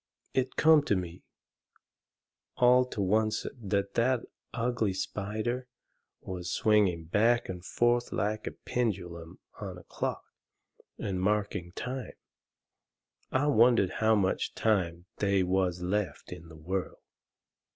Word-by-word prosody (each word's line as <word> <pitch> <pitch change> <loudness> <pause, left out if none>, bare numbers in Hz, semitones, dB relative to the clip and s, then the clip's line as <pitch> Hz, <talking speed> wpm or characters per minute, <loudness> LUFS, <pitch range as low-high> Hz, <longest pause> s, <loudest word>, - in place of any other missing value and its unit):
It 130 0 0
come 160 -1 +6
to 105 - +2
me 90 -1 -5 1.4
all 125 +1 +6
to 110 -5 -4
oncet 110 0 +1
that 100 -1 -1
that 125 +1 +2 0.3
ugly 115 -4 0
spider 110 +6 -3 0.5
was 90 -2 -5
swinging 100 -7 +2
back 115 +8 +2
and 90 -1 -6
forth 120 +3 +1
like 105 0 -1
the - - -3
pendulum 90 -7 -3 0.2
on - - -6
a - - -12
clock, - - -3 0.7
and 95 -2 -3
marking 105 -3 0
time. 125 +5 -5 1.2
I 130 +2 +2
wondered 120 -8 +4
how 110 0 +5
much 95 -3 0
time 90 -6 0
they 100 -2 +2
was 90 -1 0
left 100 +1 -2
in 85 -2 -9
the 80 -1 -12
world. 90 +4 -4
105 Hz, 120 wpm, -30 LUFS, 90-120 Hz, 1.4 s, come